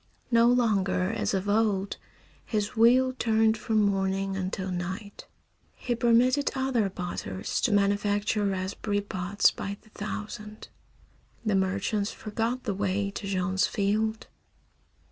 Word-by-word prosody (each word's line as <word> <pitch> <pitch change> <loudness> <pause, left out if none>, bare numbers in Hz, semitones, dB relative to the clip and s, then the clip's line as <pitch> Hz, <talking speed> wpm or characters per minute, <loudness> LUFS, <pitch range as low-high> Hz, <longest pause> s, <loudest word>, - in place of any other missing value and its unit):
No 230 0 +5
longer, 205 -6 +2
as 225 - -1
of 190 +1 -2
old, 205 -2 +1 0.5
his 210 -1 -2
wheel 250 +3 +5
turned 220 -1 +3
from 220 0 0
morning 195 -1 0
until 190 0 -3
night. 185 +4 -5 0.5
He 245 - -2
permitted 245 +4 +3
other 260 -6 +1
potters 135 - -4
to - - +2
manufacture 205 +1 +1
raspberry 200 +1 -1
pots 200 0 +1
by 200 0 -5
the 215 - -21
thousand. 210 0 -7 0.8
The 215 - +1
merchants 195 +2 0
forgot 225 +4 -3
the 210 - -1
way 200 0 -1
to 200 - -6
Jean's 190 0 +1
field. 215 +2 0
205 Hz, 125 wpm, -27 LUFS, 195-225 Hz, 0.8 s, No